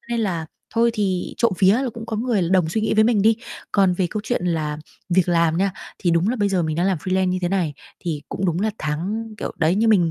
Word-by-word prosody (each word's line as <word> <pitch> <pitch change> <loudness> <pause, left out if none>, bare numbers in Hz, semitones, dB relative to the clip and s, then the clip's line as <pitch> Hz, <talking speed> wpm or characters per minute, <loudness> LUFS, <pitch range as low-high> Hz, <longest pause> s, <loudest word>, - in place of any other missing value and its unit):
cho - - -30
nên 235 -1 0
là 170 -7 -1 0.3
thôi 235 +1 +4
thì 190 -4 -1
trộm 235 -4 +2
vía 190 0 +6
là 255 +3 0
cũng 230 -1 -7
có 220 - -3
người 215 -7 0
đồng 185 -4 +3
suy 215 +7 -1
nghĩ 220 - 0
với 215 0 +5
mình 220 -3 +3
đi. 220 +1 +4 0.4
Còn 195 -3 +4
về 180 0 0
câu 215 - -2
chuyện 240 -7 -1
là 155 -3 -1 0.3
việc 180 0 +2
làm 170 -1 +3
nha, 195 +1 +1 0.3
thì 175 - +1
đúng 170 +4 +2
là 250 - 0
bây 205 -3 +1
giờ 185 -3 +1
mình 155 -1 -2
đang 175 +2 +1
làm 190 -4 +1
freelance 185 +3 0
như 185 0 0
thế 175 - +1
này, 175 -7 0 0.3
thì 155 -5 -3
cũng 195 - -3
đúng 175 +1 0
là 215 +1 +1
tháng 200 +9 -3
kiểu, - - -4
đấy 165 +1 +3
như 225 +2 +2
mình 175 -6 +4
190 Hz, 275 wpm, -22 LUFS, 170-215 Hz, 0.4 s, vía